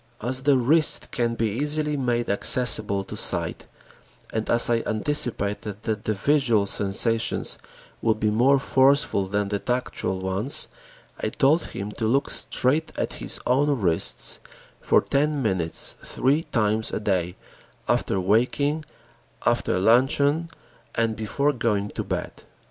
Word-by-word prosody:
As 130 +4 -2
the 140 0 +3
wrist 150 +5 +2
can 115 -1 -1
be 115 -1 -1
easily 150 +6 -1
made 120 -3 -1
accessible 105 -2 +4
to - - -9
sight - - -3 0.7
and 110 0 -3
as 115 0 +5
I 115 -1 +1
anticipated 105 -4 0
that 110 -1 -3
the 110 - 0
visual 120 -3 +1
sensations 115 +4 0 0.4
would 110 -1 0
be 105 -1 +1
more 125 +6 +3
forceful 135 -7 +2
than 100 +1 -2
the 100 0 -2
tactual 125 -5 -3
ones, 95 +8 +1 0.5
I - - -2
told 155 +4 +2
him 100 +2 -7
to 110 - 0
look 135 +5 +1
straight 150 +6 +1
at - - -2
his - - +1
own 140 +2 +1
wrists 85 -5 0 0.4
for - - +2
ten 145 +1 0
minutes 95 -7 +2
three 145 +5 0
times 110 -1 0
a - - -3
day 90 -4 -1 0.5
after 95 - 0
waking, 130 +10 0 0.6
after - - +1
luncheon, 140 - +2 0.5
and 115 -1 0
before 140 +7 -1
going 105 -5 -1
to - - -5
bed. - - -5
115 Hz, 135 wpm, -24 LUFS, 105-140 Hz, 0.7 s, as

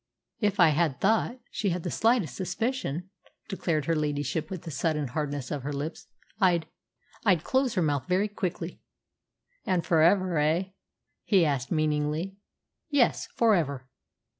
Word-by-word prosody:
"If 205 -3 0
I 165 -1 +5
thought 220 - +1
she 205 - -1
had 175 -1 -2
the 175 - -3
slightest 225 - +2
suspicion," 190 - -2 0.4
declared 165 -6 -1
her 165 - +1
ladyship 150 0 -1
with 185 -4 -6
a 165 - -5
sudden 150 -1 -1
hardness 145 -1 -3
of 145 - -2
her 145 +3 -4
lips, 145 +3 -5 0.3
"I'd 175 -5 +3 0.6
I'd 185 -8 +3
close 260 -3 +1
her 180 - +2
mouth 145 -1 0
very 185 +3 +2
quickly." 185 -4 -4 0.8
"And 180 -3 0
for 165 -2 +3
ever, 180 -1 +4
eh?" 155 +5 +2 0.6
he 190 -5 +4
asked 140 -3 -1
meaningly. 155 +3 0 0.5
"Yes, 285 -5 +2
for 230 -2 +4
ever." 140 -8 -1
170 Hz, 145 wpm, -28 LUFS, 150-195 Hz, 0.8 s, I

